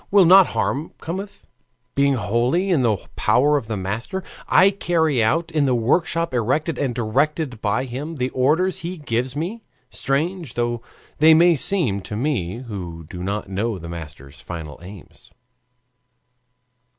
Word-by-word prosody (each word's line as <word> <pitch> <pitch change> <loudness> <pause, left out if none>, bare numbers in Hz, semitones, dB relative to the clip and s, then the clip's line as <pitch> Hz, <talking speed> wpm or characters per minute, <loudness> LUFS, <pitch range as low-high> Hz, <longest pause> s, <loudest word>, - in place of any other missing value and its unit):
Will 200 -2 +6
not 185 +2 +8
harm 150 +4 -1
come 170 +4 -4
if, 200 0 -10 0.5
being 140 0 +3
wholly 125 - 0
in 160 -7 +3
the 110 -4 +2 0.2
power 145 +4 +3
of 125 -6 -2
a 110 - -2
master, 110 - -4 0.2
I 195 +1 +5
carry 160 - +1
out, 165 +9 +1
in 155 -3 +2
the 130 -2 +2
workshop 165 +6 +1
erected 130 +7 0
and 130 -5 -1
directed 125 +2 -1
by 110 +4 0
him, 140 +6 -6
the 130 -2 -1
orders 160 +8 +2
he 175 +2 -6
gives 125 -2 -2
me, 180 +10 -4 0.3
strange 155 +2 -2
though 120 -1 -1 0.4
they 160 +1 +7
may 170 +1 +5
seem 135 - +2
to 105 - -7
me 115 - -2
who 90 -8 -7
do 90 - -7
not 100 +3 -3
know 100 +3 -2
the 85 -1 -9
Master's 75 -4 -9
final 80 -4 -8
aims? 95 0 -13
130 Hz, 155 wpm, -22 LUFS, 110-165 Hz, 0.5 s, not